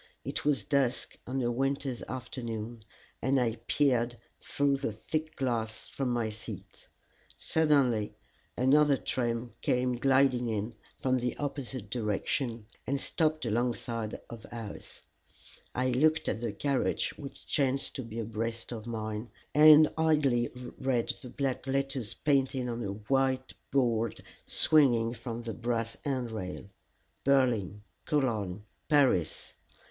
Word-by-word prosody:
It - - -3
was 145 -1 +2
dusk 135 -3 +1
on 130 +1 -1
a 120 - +1
winter's 135 0 -1
afternoon, 120 -2 -5 0.4
and 135 +2 +3
I 120 -2 0
peered 120 -4 +2 0.2
through 140 -1 +1
the 135 -4 -2
thick 155 +9 -3
glass 115 -4 -2
from 135 -2 -2
my 120 -3 0
seat. 110 - -9 0.5
Suddenly 140 -9 +2 0.4
another 140 +2 +5
train 120 -2 -2
came 125 0 +1
gliding 130 -1 +3
in 110 +1 -2 0.3
from 130 -1 +2
the 125 0 -2
opposite 135 -7 -4
direction, 115 +1 -1 0.2
and 140 +1 0
stopped 155 -1 0
alongside 115 -1 -1
of 115 -2 -9
ours. 115 -3 -7 0.7
I 130 +1 +1
looked 155 +6 +3
at 110 - -1
the 120 -3 -1
carriage 135 +6 0
which 140 -2 -9
chanced 135 -1 +1
to - - -2
be 115 -1 -8
abreast 115 +1 -3
of 115 -1 -6
mine, 110 0 -4 0.2
and 155 0 +9
idly 145 -7 +3 0.3
read 130 -3 +1
the 125 - -8
black 135 0 -2
letters 135 -4 -1
painted 135 -3 +1
on 120 0 -3
a 100 -2 -2
white 130 +5 0 0.2
board 115 -4 +1 0.2
swinging 120 -7 +4
from 115 0 -6
the 115 -1 -4
brass 115 -1 -2
handrail: 115 -11 -3 0.6
Berlin 120 -7 +2 0.2
Cologne 110 -9 0 0.3
Paris. 135 - +2
125 Hz, 125 wpm, -30 LUFS, 115-135 Hz, 0.7 s, and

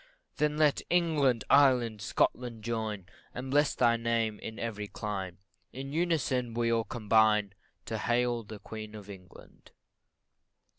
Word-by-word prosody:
Then 150 0 +1
let 150 -2 +3
England, 150 -9 +2
Ireland, 125 -6 +4
Scotland, 115 +1 -1
join, 110 -4 -3 0.3
And 130 +2 -5
bless 145 +1 +3
thy 120 -1 +3
name 115 -2 -1
in 110 - -7
every 105 -3 -4
clime 95 -5 -5 0.4
In 135 +2 -6
unison 140 -8 0
we 115 0 +1
all 115 -1 +1
combine 105 -2 +2 0.3
To 110 -1 -3
hail 120 +2 +1
the 110 0 -9
Queen 110 0 -8
of 105 -1 -9
England. 90 -2 -15
115 Hz, 135 wpm, -30 LUFS, 105-130 Hz, 0.4 s, Ireland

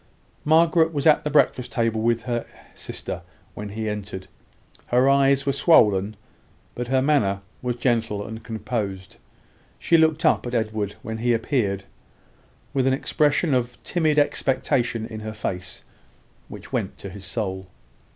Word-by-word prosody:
Margaret 160 +1 +4
was 145 -3 -2
at 155 -2 +5
the 150 - -1
breakfast 130 -4 +2
table 115 -2 0
with 115 0 +1
her 120 -2 -2 0.3
sister - - -6 0.3
when 105 0 -6
he 110 +2 -4
entered. 105 -2 -5 0.6
Her 125 +2 +3
eyes 140 0 +4
were 140 - +1
swollen, 105 - +4 0.6
but 125 0 -4
her 130 +1 +2
manner 105 -10 +2 0.2
was 125 -1 -2
gentle 115 -5 0
and 110 +1 -8
composed. 105 -4 -4 0.6
She 165 - +3
looked 160 -1 +2
up - - +3
at 120 - -3
Edward, 110 -3 -1
when 110 0 -5
he 120 +1 +2
appeared, 110 -5 -1 0.9
with 130 -1 +1
an 135 - +3
expression 145 +3 +1
of 125 -1 0
timid 155 -4 +1
expectation 130 -5 +1
in 110 -1 -7
her 110 0 -6
face, 90 -4 -5 0.6
which - - -11
went - - -2
to 100 - -8
his 100 0 -10
soul. 95 -2 -4
120 Hz, 150 wpm, -24 LUFS, 105-140 Hz, 0.9 s, at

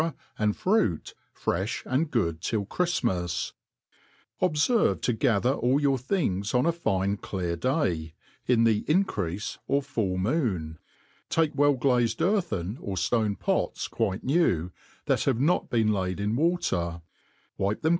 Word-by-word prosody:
and 105 -1 +1
Fruity 185 - +1 0.2
frejh 95 +6 -2
and 145 +5 0
good 85 - 0
till 105 +1 -1
Chri/imas, 100 - -1 0.9
OBSERVE 185 +7 +2
to 125 - +1
gather 120 +1 +2
all 130 +1 +2
your 140 -2 +2
things 120 - -1
on 125 - +3
a 170 - +4
fine 100 - 0
clear 90 -4 -3
day, 85 - -1
' - - -34
in 115 -2 +4
the 110 -2 +3
increafe 105 - -1
or 140 +1 +1
full 110 -9 -2
moon; 95 - -1 0.5
take 160 -2 +2
well 145 0 +3
ghzed 120 -3 +1
earthen 155 - 0
or 100 - -4
ftone 105 +3 0
pots - - -1
quite 105 -4 -2
new, 110 - +1 0.3
that - - +1
have 115 - +1
not 155 +7 +2
been 110 -2 +2
laid 95 -1 -2
in 105 +2 0
water, 120 - 0 0.6
wipe 100 +2 -1
them. 160 - +3
115 Hz, 145 wpm, -27 LUFS, 95-145 Hz, 0.9 s, a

